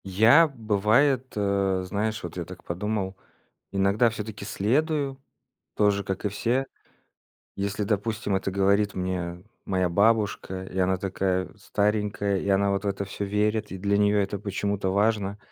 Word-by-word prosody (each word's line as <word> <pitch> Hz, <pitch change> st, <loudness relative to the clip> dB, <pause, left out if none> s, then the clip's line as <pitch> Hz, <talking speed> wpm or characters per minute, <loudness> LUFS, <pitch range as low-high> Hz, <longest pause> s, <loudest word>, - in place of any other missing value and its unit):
Я, 110 Hz, -, +6 dB
бывает, 120 Hz, +2 st, +2 dB
э, 100 Hz, -2 st, +1 dB
знаешь, 105 Hz, +3 st, -2 dB
вот 85 Hz, -1 st, -6 dB
я 90 Hz, -, -3 dB
так 90 Hz, +1 st, -11 dB
подумал, 95 Hz, +2 st, -3 dB, 0.6 s
иногда 100 Hz, +4 st, +3 dB
всё-таки 105 Hz, -2 st, -6 dB
следую 135 Hz, -, 0 dB, 0.5 s
тоже, 100 Hz, -1 st, +2 dB
как 95 Hz, +1 st, -4 dB
и -, -, +2 dB
все. 120 Hz, +6 st, 0 dB, 0.9 s
Если, 100 Hz, +1 st, -2 dB
допустим, 105 Hz, 0 st, -1 dB
это 95 Hz, 0 st, -2 dB
говорит 100 Hz, +1 st, +2 dB
мне 90 Hz, -1 st, -3 dB, 0.2 s
моя 95 Hz, -2 st, +1 dB
бабушка, 100 Hz, -1 st, +1 dB
и 95 Hz, -, -10 dB
она 95 Hz, 0 st, +2 dB
такая 95 Hz, -1 st, -1 dB
старенькая, 105 Hz, -1 st, 0 dB
и 100 Hz, -, -4 dB
она 100 Hz, 0 st, +3 dB
вот 100 Hz, +1 st, -2 dB
в -, -, 0 dB
это 100 Hz, 0 st, -2 dB
всё 100 Hz, +1 st, -5 dB
верит, 105 Hz, +1 st, 0 dB
и 95 Hz, -, -5 dB
для 100 Hz, +2 st, +1 dB
неё 105 Hz, 0 st, +3 dB
это 100 Hz, 0 st, -1 dB
почему-то 100 Hz, -1 st, -2 dB
важно. 100 Hz, 0 st, +1 dB
100 Hz, 150 wpm, -26 LUFS, 95-105 Hz, 0.9 s, Я